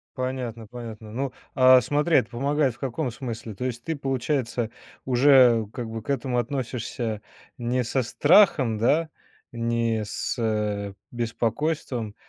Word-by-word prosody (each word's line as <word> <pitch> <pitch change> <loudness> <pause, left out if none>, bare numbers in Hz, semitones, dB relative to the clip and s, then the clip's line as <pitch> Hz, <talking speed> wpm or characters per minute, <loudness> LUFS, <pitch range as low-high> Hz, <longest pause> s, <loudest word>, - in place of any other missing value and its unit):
Понятно, 125 -4 -4
понятно. 110 -2 -9
Ну, 130 +2 -3 0.2
а 130 -1 +7
смотри, 145 +6 +2
это 130 - +1
помогает 140 +1 0
в - - -24
каком 135 +1 -2
смысле? 115 -3 -6
То 125 - -4
есть 120 -2 -4
ты, 165 -1 -2
получается, 130 -3 -1 0.4
уже 125 -3 +5
как 120 -3 -5
бы 110 -1 -6
к - - -13
этому 130 -3 -1
относишься 120 -3 -3 0.4
не 125 +1 0
со 130 +3 0
страхом, 140 - +4
да, 155 +9 +2 0.4
не 115 -1 0
с, - - -3
э, 105 -3 -1 0.2
беспокойством, 120 0 -2
120 Hz, 135 wpm, -25 LUFS, 115-135 Hz, 0.4 s, а